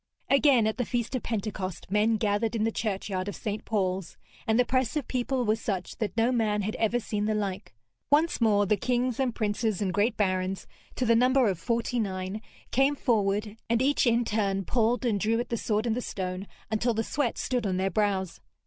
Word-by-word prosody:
Again 275 -4 +5
at 220 - 0
the - - +2
feast 235 0 -2
of 255 - -1
Pentecost 195 -5 -4
men 215 +2 +3
gathered 215 +2 0
in 220 - 0
the 225 - +1
churchyard 195 -3 -2
of 205 - -4
St. 210 0 -4
Paul's, 190 -4 -1 0.3
and 220 0 +3
the 250 - +4
press 255 0 0
of 295 -5 -2
people 255 0 -1
was 220 +1 +1
such 190 -4 -3
that 220 0 -3
no 230 +2 +3
man 215 -4 +1
had 215 +2 -2
ever 230 +2 +1
seen 210 -2 -2
the 215 0 +1
like. 195 - -4 0.3
Once 300 0 +3
more 205 -3 +4
the 205 +2 +2
kings 250 +3 0
and 255 -3 0
princes 215 -2 -1
and 190 -3 -1
great 215 +3 +1
barons, 185 -1 0 0.3
to 255 - -1
the 230 - +4
number 255 +1 +4
of 190 -4 -1
forty 235 +4 -1
nine, 190 0 -3 0.3
came 270 +3 +3
forward, 210 -4 0
and 230 0 +3
each 275 0 +2
in 235 0 +3
turn 195 -3 0
pulled 235 +1 +1
and 215 -4 +1
drew 225 +3 +1
at 240 - -3
the 235 - 0
sword 215 0 0
in 230 - +1
the 245 - -2
stone 185 -2 -4 0.2
until 225 +2 +1
the 225 - 0
sweat 270 -1 -1
stood 245 -4 -1
on 185 -1 0
their 190 +1 0
brows. 195 -2 -1
220 Hz, 210 wpm, -28 LUFS, 200-240 Hz, 0.3 s, Again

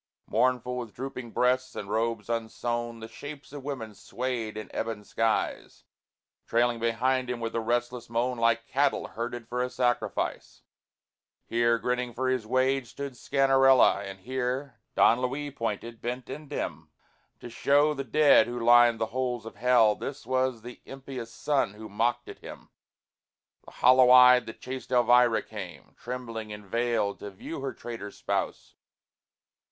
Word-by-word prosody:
Mournful, 125 +1 0
with 115 -4 -8
drooping 125 -2 -6
breasts 130 +2 +1
and 100 - -5
robes 115 +1 -1
unsewn 115 0 -3
The 110 - -7
shapes 145 +3 -10
of 145 -2 -8
women 125 -6 -5
swayed 115 0 -4
in 110 - -6
ebon 110 -2 -3
skies, 115 +1 -2 0.6
Trailing 120 0 +2
behind 125 +3 0
him 125 -1 -3
with 115 -1 -4
a 115 - 0
restless 120 +1 -2
moan 120 +1 -1
Like 115 0 +2
cattle 140 +1 0
herded 120 0 -5
for 125 +1 -2
a 125 - -1
sacrifice. 120 -1 -2 0.8
Here, 115 0 +2
grinning 125 0 -2
for 130 +1 0
his 130 -4 -1
wage, 130 +1 +1
stood 140 +3 -6
Sganarelle, 135 -4 +4
And 95 -1 -8
here 130 +3 -3 0.2
Don 120 +2 +5
Luis 140 +3 -3
pointed, 115 +1 -4
bent 125 +1 -4
and 150 +1 -8
dim, 80 - -5 0.5
To - - -9
show 145 +5 +2
the 140 -2 -4
dead 145 -2 +5
who 120 0 -4
lined 120 0 +6
the 115 - +1
holes 125 -3 -2
of 115 - -10
Hell, 120 -2 +4
This 140 +5 -7
was 130 -2 0
that 125 +1 -10
impious 130 -3 -8
son 135 -5 0
who 110 +1 -9
mocked 120 +4 -1
at - - -10
him. - - -11 1.0
The - - -13
hollow 130 0 +5
eyed, 125 0 +8
the 110 - -6
chaste 130 +2 -8
Elvira 120 -1 +4
came, 95 -6 -9
Trembling 115 -3 -6
and 105 0 -9
veiled, 115 -1 -1
to 105 - -7
view 105 +10 -8
her 135 -1 -3
traitor 115 -5 -7
spouse. - - -3
120 Hz, 155 wpm, -28 LUFS, 115-130 Hz, 1.0 s, eyed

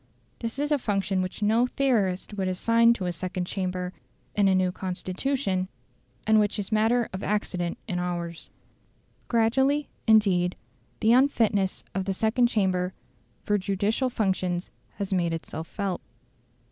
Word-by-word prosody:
This 230 +2 -4
is 290 +2 -1
a 295 - +3
function 195 -4 0
which 185 +3 -4
no 225 +4 +3
theorist 220 -9 0
would 195 -2 -1
assign 230 +5 +4
to 195 -6 -4
a 180 - 0
second 180 +1 -3
chamber 180 -1 -3 0.4
in 205 -1 +3
a 190 - +4
new 185 -1 +2
Constitution, 185 +2 -2 0.6
and 220 0 +5
which 210 0 +1
is 205 +1 -4
matter 225 +2 +3
of 190 - -5
accident 180 -4 -1
in 180 -4 -2
ours. 175 -2 -4 0.8
Gradually, 265 +6 +2 0.2
indeed, 190 -5 +4 0.5
the 225 +2 +5
unfitness 225 -7 +2
of 190 0 -2
the 195 - 0
second 225 +5 +2
chamber 185 -5 0 0.5
for 205 0 +1
judicial 200 +6 0
functions 185 -5 -1 0.2
has 200 -1 -2
made 170 -3 +1
itself 160 0 -5
felt. 195 -2 -3
195 Hz, 145 wpm, -27 LUFS, 185-225 Hz, 0.8 s, and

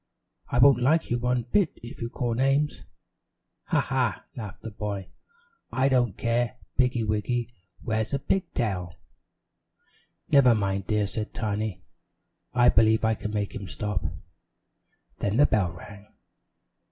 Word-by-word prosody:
I - - 0
won't 125 0 +6
like 155 +4 +2
you 120 - +1
one 125 0 0
bit 170 - +1
if 120 - -9
you 115 - -2
call 120 -1 -2
names." 135 +4 +1 0.8
"Ha, - - +2
ha!" 130 -3 -1
laughed 105 -6 -8
the 115 - -6
boy. 100 -3 -4 0.6
"I 130 +1 +2
don't 125 -6 +2
care! 120 +1 0 0.2
Piggy 125 -3 +2
wiggy 115 +3 -1 0.3
wears 110 -1 -1
a 140 - +1
pig 180 +7 -1
tail." 90 -7 -2 1.4
"Never 125 -4 +6
mind, 100 -2 -1
dear," 105 -1 +1
said 105 +2 -4
Tiny. 105 -3 -2 0.7
"I 120 0 +5
believe 110 -1 +4
I 110 - +3
can 105 - -4
make 105 -2 -2
him 100 -5 -6
stop." 105 -1 -3 1.2
Then 100 +2 0
the 145 - +7
bell 95 -9 +1
rang. 100 +3 -12
115 Hz, 140 wpm, -26 LUFS, 105-125 Hz, 1.4 s, the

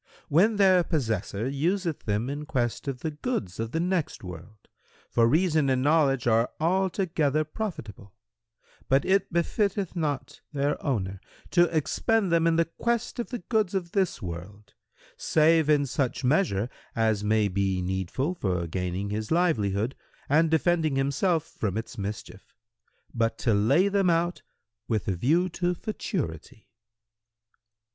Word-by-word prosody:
"—"When 200 +9 +4
their 190 -3 +5
possessor 115 - -2
useth 165 +4 -1
them 105 +3 0
in 145 +2 -5
quest 125 -3 -2
of 130 -3 -4
the 160 - -2
goods 150 - -4
of 115 0 -2
the 160 - -2
next 175 - -1
world, 90 +4 -10 0.4
for 115 -1 +4
reason 155 0 +2
and 130 -1 +1
knowledge 145 -4 +3
are 115 0 +3
altogether 170 -4 +1
profitable; 150 - -6 0.8
but 135 +1 +3
it 195 +1 +2
befitteth 195 +2 0
not 150 -5 -3
their 145 +1 -1
owner 100 -8 -2 0.3
to 175 -1 +5
expend 185 +5 0
them 165 0 +3
in 165 - +3
the 165 0 +3
quest 235 +8 -2
of 240 - -3
the 245 - -3
goods 215 -5 +1
of 175 -3 -2
this 190 - 0
world, 100 +4 -8 0.4
save 160 0 +3
in 145 -2 +4
such 135 0 -2
measure 125 - +2 0.3
as 110 -2 +1
may 105 0 +2
be 95 -1 0
needful 95 - -2
for 90 - -1
gaining 90 +3 -3
his 110 +1 -3
livelihood 115 - +1 0.3
and 160 +3 +3
defending 160 -2 +2
himself 145 +5 +1
from 105 - -4
its 115 +1 -6
mischief; 100 -1 -7 0.6
but 115 -1 0
to 115 - +1
lay 135 - +3
them 200 -2 +2
out 170 +1 +1 0.5
with 110 -3 -1
a 95 - 0
view 160 - +2
to 180 0 -1
futurity." 150 - -5
145 Hz, 145 wpm, -27 LUFS, 110-175 Hz, 0.8 s, their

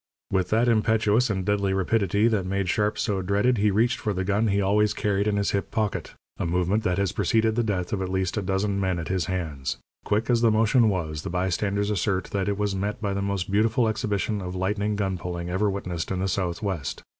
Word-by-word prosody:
With 95 -2 +1
that 115 +3 +2
impetuous 110 +1 +3
and 95 -3 -1
deadly 100 -1 +1
rapidity 100 +2 +2
that 105 -5 0
made 100 0 -1
Sharp 105 +2 +1
so 100 -2 -1
dreaded, 100 +5 +1
he 105 +1 +3
reached 115 +6 +2
for 105 -4 -1
the 95 0 -2
gun 100 +4 +1
he 100 -1 +1
always 105 +2 +2
carried 100 0 0
in 105 -1 +1
his 100 - +1
hip 100 - -1
pocket 110 -3 -2 0.2
a - - -1
movement 90 +5 +1
that 90 -5 0
has 100 -1 +1
preceded 110 0 +1
the 120 - +2
death 95 -5 -2
of 100 - -1
at 95 - -2
least 95 -1 -1
a 105 - 0
dozen 100 +1 -1
men 95 -2 0
at 85 - -5
his 95 -3 0
hands. 80 -7 -3 0.3
Quick 105 +2 0
as 120 -2 +2
the 115 - +5
motion 110 +2 +4
was, 80 -6 -2
the - - -5
bystanders 100 +3 0
assert 95 -1 -1
that 100 0 -1
it 100 - -1
was 105 -1 0
met 100 +2 -2
by 100 -3 -2
the 100 - -2
most 100 -1 -2
beautiful 110 +3 +2
exhibition 105 -1 -1
of 90 0 -5
lightning 100 +3 -1
gun 95 -3 -1
pulling 85 0 -4
ever 100 +3 +1
witnessed 90 -4 -4
in 95 - -1
the 95 +1 -1
Southwest. 95 -3 -2
100 Hz, 225 wpm, -25 LUFS, 95-105 Hz, 0.3 s, the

